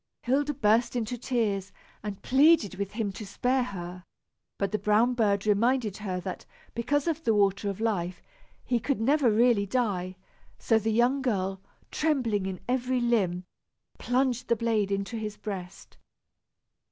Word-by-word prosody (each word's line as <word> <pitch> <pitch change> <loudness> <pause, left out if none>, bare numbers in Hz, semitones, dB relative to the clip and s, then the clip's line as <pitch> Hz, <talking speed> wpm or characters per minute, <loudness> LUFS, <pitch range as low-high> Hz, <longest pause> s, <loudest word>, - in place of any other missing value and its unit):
Hilda 285 +3 +1
burst 225 +2 +2
into 240 0 -2
tears 220 -6 -1 0.3
and 205 -2 -6
pleaded 280 - +4
with 195 +1 -4
him 215 -2 -2
to 200 - -8
spare 250 +6 0
her; 180 -6 -6 0.5
but 200 - -1
the 215 - -1
brown 220 +4 +3
bird 205 -4 +1
reminded 215 0 +2
her 190 -4 -3
that, 185 0 -6 0.3
because 270 +5 0
of 325 -1 -1
the 225 - +2
water 200 0 +2
of 195 - -5
life, 185 -6 -1 0.5
he 245 - +1
could 270 +2 -1
never 270 +2 +3
really 220 -2 +3
die; 190 -5 -1 0.4
so 225 -2 +2
the 220 +1 -1
young 245 +5 +2
girl, 195 -6 -1 0.3
trembling 240 -11 0
in 190 -1 -5
every 255 0 0
limb, 200 -7 +1 0.6
plunged 250 -1 0
the 235 - +3
blade 220 -3 0
into 200 +4 -2
his 210 -1 -5
breast. 190 -4 -8
220 Hz, 155 wpm, -28 LUFS, 200-245 Hz, 0.6 s, pleaded